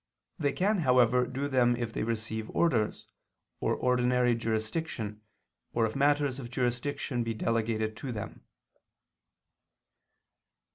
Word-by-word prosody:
They 145 -3 +2
can, 200 +2 +1
however, 125 -3 +4
do 135 +2 -2
them 125 -3 +3
if 120 -2 -4
they - - -2
receive 110 -1 -2
orders, 125 -11 +1 0.5
or - - +1
ordinary 125 -1 +2
jurisdiction, 110 0 -3 0.5
or 115 -1 +2
if 110 - -3
matters 145 -1 +2
of 120 -3 -7
jurisdiction 125 +1 -1
be 115 -1 -3
delegated 110 -1 0
to 135 - -5
them. 105 -3 -6
120 Hz, 115 wpm, -30 LUFS, 115-135 Hz, 0.5 s, however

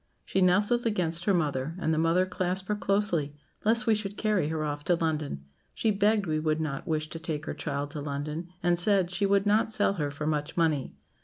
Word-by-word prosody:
She 190 - 0
nestled 205 +6 +3
against 175 -5 -1
her 200 - +3
mother, 150 -2 -1
and 160 -3 0
the 155 - +1
mother 165 +3 +3
clasped 185 +1 -2
her 210 - +2
closely, 185 -7 0 0.3
lest 230 +3 +3
we 225 - +4
should 205 -1 -3
carry 210 -8 +1
her 160 0 -2
off 145 -1 -3
to 175 - +3
London. 155 - -2 0.3
She 220 - +1
begged 205 +1 +2
we 155 -2 0
would 155 0 0
not 150 -4 -3
wish 155 -1 -1
to 165 - -7
take 155 -2 -4
her - - -3
child 145 -1 -4
to 150 -1 -5
London, 150 +4 -4 0.2
and 175 0 +2
said, 190 -1 +2
'she 200 +2 +1
would 200 0 +3
not 210 +2 +3
sell 210 -2 +2
her 150 -7 -2
for 145 +2 -5
much 150 0 -2
money.' 155 -5 +1
170 Hz, 220 wpm, -28 LUFS, 155-200 Hz, 0.3 s, we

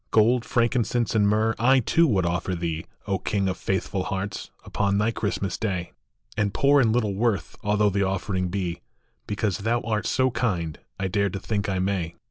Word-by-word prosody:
Gk>ld, 115 +2 +4
frankincense, 120 0 +1
and 105 -2 +3
myrrh 110 +2 +2
I, 130 +3 +5
too, 165 +7 +3
would 95 - +2
offer 90 +2 -1
thee, 85 -1 -3 0.2
O 95 -2 -1
King 100 +1 0
of 95 - 0
faithful 95 0 -2
hearts, 95 +1 -4 0.2
upon 100 -1 0
thy 105 +3 +2
Christmas 100 -4 -2
Day; 90 -5 -2 0.5
\nd 100 -1 0
ipoor 140 0 +5
and 115 -3 +3
little 110 -3 +1
worth 110 0 0
although 105 0 +2
the 100 +1 0
offering 95 -1 -1
be, 90 -2 -3 0.5
Because 105 -3 -1
thou 115 +3 +1
art 110 -2 -1
so 130 0 +2
kind, 90 -11 -1 0.2
I 95 - 0
dare 100 +2 +1
to 95 - -5
think 100 +1 -2
I 95 - 0
may. 90 -3 -1
100 Hz, 185 wpm, -25 LUFS, 95-115 Hz, 0.5 s, I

